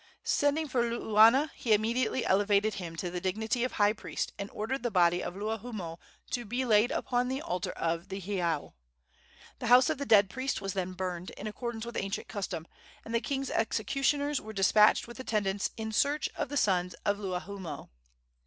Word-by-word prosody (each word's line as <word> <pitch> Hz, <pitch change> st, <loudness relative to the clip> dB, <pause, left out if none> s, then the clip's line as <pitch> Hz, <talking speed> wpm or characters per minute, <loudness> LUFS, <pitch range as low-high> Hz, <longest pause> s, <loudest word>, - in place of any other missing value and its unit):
Sending 290 Hz, +2 st, +1 dB
for 255 Hz, -3 st, +1 dB
Luuana, 235 Hz, +4 st, +4 dB
he 225 Hz, -, +1 dB
immediately 230 Hz, +3 st, +1 dB
elevated 205 Hz, +2 st, +3 dB
him 170 Hz, -4 st, -6 dB
to 175 Hz, +2 st, -4 dB
the 180 Hz, 0 st, -4 dB
dignity 220 Hz, +6 st, -1 dB
of 255 Hz, -, -1 dB
high 205 Hz, 0 st, +3 dB
priest, -, -, -4 dB
and 200 Hz, 0 st, -4 dB
ordered 230 Hz, +5 st, -3 dB
the 240 Hz, -, -1 dB
body 175 Hz, -3 st, +3 dB
of 180 Hz, -, -5 dB
Luahoomoe 210 Hz, -5 st, -4 dB, 0.3 s
to 245 Hz, -, -1 dB
be 245 Hz, +4 st, -2 dB
laid 220 Hz, 0 st, +4 dB
upon 245 Hz, 0 st, 0 dB
the 260 Hz, +1 st, -2 dB
altar 180 Hz, -, -3 dB
of 170 Hz, +3 st, -2 dB
the 195 Hz, 0 st, -4 dB
heiau. 175 Hz, -5 st, -2 dB, 0.9 s
The -, -, -3 dB
house 250 Hz, +4 st, +6 dB
of 305 Hz, -, -3 dB
the 280 Hz, -, -3 dB
dead 205 Hz, -3 st, +6 dB
priest 260 Hz, +7 st, -2 dB
was 195 Hz, -1 st, -4 dB
then 185 Hz, -1 st, -2 dB
burned, 180 Hz, -1 st, -4 dB
in 205 Hz, -, -7 dB
accordance 225 Hz, +1 st, -4 dB
with 235 Hz, -, -7 dB
ancient 195 Hz, +1 st, -3 dB
custom, 185 Hz, -6 st, -4 dB, 0.4 s
and 225 Hz, -, -6 dB
the 230 Hz, -, +2 dB
king's 275 Hz, -2 st, -2 dB
executioners 275 Hz, +6 st, 0 dB
were 220 Hz, +1 st, -8 dB
despatched 210 Hz, +3 st, +4 dB
with 240 Hz, +2 st, -10 dB
attendants 205 Hz, -5 st, -1 dB
in 220 Hz, -1 st, -4 dB
search 285 Hz, +6 st, +1 dB
of -, -, -3 dB
the 290 Hz, -, -2 dB
sons 180 Hz, -6 st, +1 dB
of 205 Hz, 0 st, +1 dB
Luahoomoe. 190 Hz, -1 st, -5 dB
215 Hz, 185 wpm, -30 LUFS, 190-245 Hz, 0.9 s, house